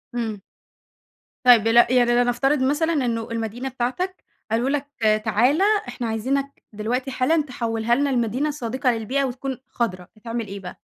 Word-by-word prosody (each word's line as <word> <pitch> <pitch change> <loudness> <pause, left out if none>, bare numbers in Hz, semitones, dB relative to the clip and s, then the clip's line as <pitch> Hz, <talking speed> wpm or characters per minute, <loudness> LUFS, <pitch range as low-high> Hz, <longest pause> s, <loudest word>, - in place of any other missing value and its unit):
إمم. 220 -4 -3 1.0
طيب 240 -4 +7
دل 225 +1 +2
يعني 245 -1 +3
لنفترض 245 +4 +2
مثلًا 320 +5 +1
إنه 235 -6 -1
المدينة 230 +3 -3
بتاعتك، 265 +10 -3 0.3
قالوا 235 +4 +1
لك: 285 0 -1 0.4
"تعالَ 245 - +3 0.3
إحنا 240 - -4
عايزينك 270 +6 -2
دلوقتي 245 +6 -2
حالًا 305 +6 +2
تحوّلها 235 -3 -1
لنا 285 +2 +1
لمدينة 255 +3 0
صديقة 260 -1 -1
للبيئة، 235 +5 -1
وتكون 260 0 -3
خضرا." 185 -7 -3
هتعمل 230 0 -5
إيه 200 +1 -7
بقى؟ 180 -2 -9
245 Hz, 145 wpm, -23 LUFS, 225-270 Hz, 1.0 s, طيب